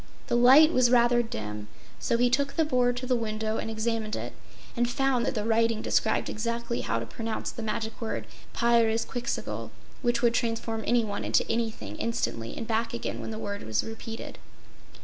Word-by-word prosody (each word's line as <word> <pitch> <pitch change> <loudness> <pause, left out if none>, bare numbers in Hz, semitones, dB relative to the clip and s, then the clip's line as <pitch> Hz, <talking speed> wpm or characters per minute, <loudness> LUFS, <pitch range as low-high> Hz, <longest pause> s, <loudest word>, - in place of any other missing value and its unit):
The - - +2
light 270 +7 +7
was 255 -1 +4
rather 240 0 +5
dim, 105 - -5 0.3
so 235 - +1
he 245 0 +3
took 280 +2 +1
the 320 - +3
board 245 -4 +2
to 255 - -3
the 255 0 +2
window 220 -1 -2
and - - -3
examined 220 -1 -1
it, - - -5 0.4
and 240 0 +1
found 270 -2 +1
that - - -1
the 210 - -1
writing 230 0 +2
described 220 - +1
exactly 235 +2 -2
how 115 - -1
to 115 - -3
pronounce 220 - -4
the 230 - -7
magic 220 +1 -3
word 225 - -3 0.3
Pyrzqxgl, 235 +1 0 0.3
which 240 -1 +1
would 235 -1 +4
transform 225 -2 -1
anyone 225 -4 +1
into - - +2
anything 220 - -2
instantly, 175 - -2
and 230 - -4
back 230 +1 -1
again 235 - -4
when - - -5
the 220 - -5
word 205 -2 -4
was 110 -1 -1
repeated. 225 0 -7
230 Hz, 180 wpm, -28 LUFS, 220-240 Hz, 0.4 s, light